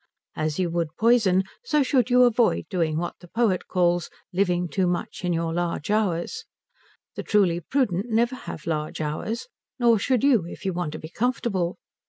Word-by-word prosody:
As 155 -1 -2
you 180 -2 0
would 165 -2 -2
poison, 220 -5 +4 0.2
so 300 -11 +2
should 255 -3 +2
you 250 0 +6
avoid 240 -1 +3
doing 165 -4 0
what 175 +1 -4
the 175 - -14
poet 215 -2 0
calls 175 -1 +1 0.2
living 180 -2 +1
too 185 +3 0
much 175 +1 -3
in 180 - 0
your 165 -1 -1
large 175 0 -2
hours. 195 -6 0 0.7
The - - -5
truly 190 -5 +2
prudent 205 - 0
never 235 +2 +2
have 155 - -8
large 155 -2 -2
hours; 155 - -3 0.3
nor 235 -4 +4
should 255 +3 +1
you, 240 -12 +4
if 185 - -10
you 190 - 0
want 170 -4 -3
to - - -5
be 155 - -9
comfortable. 215 -6 -1
185 Hz, 180 wpm, -25 LUFS, 170-235 Hz, 0.7 s, you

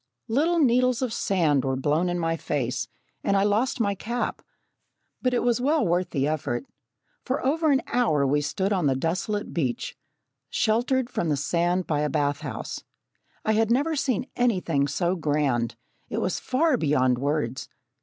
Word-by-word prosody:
Little 315 +9 +2
needles 255 -3 +3
of 245 -3 -2
sand 160 - +2
were 130 -1 0
blown 150 +6 +1
in 175 - -1
my 165 -1 0
face, 125 -5 -2 0.4
and 200 - +2
I 195 - +3
lost 220 +6 +1
my 200 -3 +2
cap, 235 +5 -3 0.8
but 255 - +1
it 245 - +1
was 245 0 +2
well 295 0 +2
worth 175 0 +1
the 140 -3 0
effort. 140 -5 -2 0.6
For 260 0 -2
over 315 +4 +2
an 270 - +2
hour 215 - +2
we 145 +2 +2
stood 190 +7 -1
on 180 -6 +1
the 135 - +2
desolate 180 +8 -2
beach, 130 -8 -2 0.5
sheltered 245 +3 +1
from 175 -10 -2
the 145 - +1
sand 175 +5 0
by 150 -2 0
a 150 0 0
bath 145 -1 0
house. 150 -4 -6 0.6
I 220 - +3
had 220 0 +2
never 285 +7 +2
seen 260 -4 0
anything 180 - +1
so 175 +6 0
grand 145 -8 0 0.3
it - - -3
was - - -1
far 275 +2 +2
beyond 130 - +2
words. 135 -3 -2
180 Hz, 170 wpm, -25 LUFS, 145-245 Hz, 0.8 s, needles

